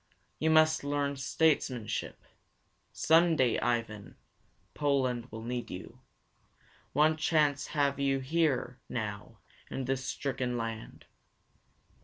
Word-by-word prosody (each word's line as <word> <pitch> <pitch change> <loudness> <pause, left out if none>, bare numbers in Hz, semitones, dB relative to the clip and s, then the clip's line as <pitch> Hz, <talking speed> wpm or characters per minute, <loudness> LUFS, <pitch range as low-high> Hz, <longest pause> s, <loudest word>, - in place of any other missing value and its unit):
You 160 - +2
must 155 -1 +4
learn 145 0 -1
statesmanship. 135 -5 0 0.7
Some 165 +1 +4
day, 130 -6 +2
Ivan, 110 -4 -2 0.6
Poland 130 -5 0
will 110 0 -7
need 120 +1 -4
you. 90 - -9 0.9
What 155 +1 +3
chance 150 -3 +2
have 140 -1 +2
you 135 -1 +2
here 135 -3 0
now 105 -4 -5 0.3
in 135 - -4
this 130 0 -1
stricken 130 -2 -2
land? 115 -1 -6
135 Hz, 105 wpm, -30 LUFS, 120-150 Hz, 0.9 s, must